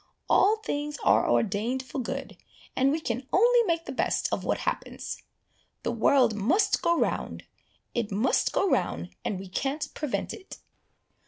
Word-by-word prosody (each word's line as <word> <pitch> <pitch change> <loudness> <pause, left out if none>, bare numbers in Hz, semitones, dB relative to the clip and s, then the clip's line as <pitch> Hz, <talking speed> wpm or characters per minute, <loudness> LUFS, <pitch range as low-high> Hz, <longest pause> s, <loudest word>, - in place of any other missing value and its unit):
All 415 +3 +5
things 295 -8 -3
are - - +4
ordained 225 +5 +1
for 260 - -6
good, 270 +3 -5 0.4
and 270 +1 +3
we 310 - 0
can 250 -3 -4
only 475 +5 +5
make 330 -1 0
the - - -5
best 265 - 0
of - - -1
what - - 0
happens. - - -4 0.6
The - - 0
world 240 0 +3
must 330 - +2
go 340 0 +2
round, - - -1 0.5
it 235 -3 -2
must 225 +6 +2
go 395 - +1
round, 85 - 0
and 200 - -2
we 195 - -8
can't 275 +10 -3
prevent 300 -3 -3
it." 385 -3 -10
270 Hz, 160 wpm, -27 LUFS, 230-330 Hz, 0.6 s, All